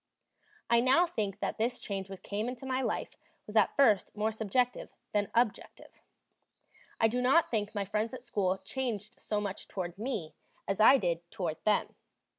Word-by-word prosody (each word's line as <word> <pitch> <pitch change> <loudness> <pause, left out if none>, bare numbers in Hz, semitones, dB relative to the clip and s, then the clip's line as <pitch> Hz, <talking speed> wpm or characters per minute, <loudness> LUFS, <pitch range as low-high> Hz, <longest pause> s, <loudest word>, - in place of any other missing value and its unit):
I 235 0 +5
now 265 +8 +5
think 210 - -3
that - - -2
this 235 +3 0
change 195 -2 -5
which 195 -1 -9
came 210 +4 -2
into 255 +1 -7
my 260 0 0
life - - -2 0.3
was 210 - -10
at 215 -3 +4
first 225 -8 +4
more 215 +1 +1
subjective 225 +3 -1 0.2
than 205 -1 0
objective. 235 -2 -1 1.0
I 225 - +5
do 245 +3 -1
not 300 +7 +4
think 210 -2 -1
my 200 -1 -1
friends 210 +3 -1
at 255 - -11
school 190 -5 0
changed 220 -4 -4
so 210 - -2
much 200 -2 -5
toward 180 -1 -5
me 215 -9 -3 0.3
as 195 +1 -1
I 240 +6 +8
did 170 -5 -2
toward 165 -4 -4
them. 210 -1 +2
215 Hz, 175 wpm, -31 LUFS, 195-245 Hz, 1.0 s, I